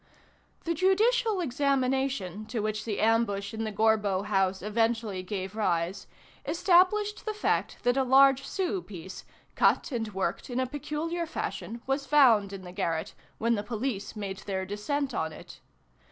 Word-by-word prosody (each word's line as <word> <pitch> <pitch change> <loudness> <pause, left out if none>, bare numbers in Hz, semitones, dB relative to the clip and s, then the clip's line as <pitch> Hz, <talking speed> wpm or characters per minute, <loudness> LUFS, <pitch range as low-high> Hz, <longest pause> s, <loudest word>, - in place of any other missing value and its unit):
The 335 - 0
judicial 410 +4 +2
examination 265 - 0
to 235 - -3
which 215 0 -2
the 215 -3 -2
ambush 215 -3 +1
in 220 0 -3
the 215 - -3
Gorbeau 210 -2 +2
house 195 -2 +1
eventually 225 -2 0
gave 190 +1 -5
rise, 180 -2 -1 0.4
established 385 +4 +3
the 430 -1 -3
fact 425 - 0
that 245 0 +3
a 270 - +3
large 270 +1 +5
sou 380 0 -2
piece, 185 - -9 0.3
cut - - +2
and 225 -4 -2
worked 190 +1 -3
in 245 0 -2
a 260 - +1
peculiar 305 +5 -3
fashion, 230 - -5
was 270 +1 -1
found 235 -9 +5
in 195 -1 -7
the 180 - -9
garret, 170 -4 -2 0.2
when 230 +1 +1
the 210 - 0
police 225 0 -4
made 200 -2 -4
their 190 -2 -3
descent 260 +8 -2
on 160 -5 -1
it. 155 - -12
225 Hz, 155 wpm, -28 LUFS, 200-275 Hz, 0.4 s, large